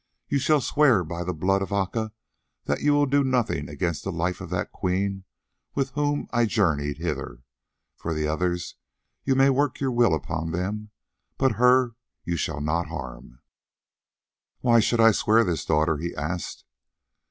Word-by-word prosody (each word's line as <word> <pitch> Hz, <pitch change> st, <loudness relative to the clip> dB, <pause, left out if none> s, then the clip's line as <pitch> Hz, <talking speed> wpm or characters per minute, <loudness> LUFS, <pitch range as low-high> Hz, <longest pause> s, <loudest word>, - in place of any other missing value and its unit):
You 140 Hz, -, +1 dB
shall 150 Hz, +2 st, +3 dB
swear 130 Hz, -9 st, +3 dB
by 85 Hz, +2 st, -5 dB
the 90 Hz, -, -2 dB
blood 95 Hz, +4 st, +1 dB
of 95 Hz, -, -4 dB
Aca 100 Hz, +3 st, -1 dB, 0.5 s
that 70 Hz, -, -1 dB
you 145 Hz, -, +3 dB
will 145 Hz, 0 st, +4 dB
do 140 Hz, +1 st, +2 dB
nothing 120 Hz, -, 0 dB
against 75 Hz, +2 st, -2 dB
the 95 Hz, -, -3 dB
life 90 Hz, +1 st, -2 dB
of -, -, -7 dB
that -, -, -2 dB
Queen 95 Hz, +1 st, -2 dB, 0.5 s
with 135 Hz, -1 st, 0 dB
whom 145 Hz, 0 st, -1 dB
I 120 Hz, -1 st, +3 dB
journeyed 75 Hz, -9 st, +1 dB
hither. 65 Hz, -7 st, -4 dB, 0.5 s
For 80 Hz, -1 st, -3 dB
the 75 Hz, 0 st, -1 dB
others, 85 Hz, +2 st, -2 dB, 0.5 s
you 135 Hz, -, +2 dB
may 135 Hz, +1 st, +5 dB
work 140 Hz, +2 st, 0 dB
your 135 Hz, -2 st, 0 dB
will 120 Hz, -8 st, +3 dB
upon 80 Hz, +2 st, -4 dB
them, 105 Hz, +5 st, -3 dB, 0.5 s
but 135 Hz, -1 st, +3 dB
her 125 Hz, -1 st, +5 dB, 0.3 s
you 85 Hz, -, -2 dB
shall 75 Hz, -2 st, -2 dB
not 80 Hz, +3 st, 0 dB
harm." 65 Hz, -5 st, -8 dB, 1.2 s
"Why 120 Hz, -1 st, +5 dB
should 115 Hz, +2 st, +1 dB
I 115 Hz, 0 st, +7 dB
swear 110 Hz, +2 st, +3 dB
this, 85 Hz, -7 st, -2 dB
daughter?" 75 Hz, 0 st, +2 dB
he 85 Hz, +2 st, -4 dB
asked. 85 Hz, +5 st, -4 dB
95 Hz, 165 wpm, -25 LUFS, 80-125 Hz, 1.2 s, I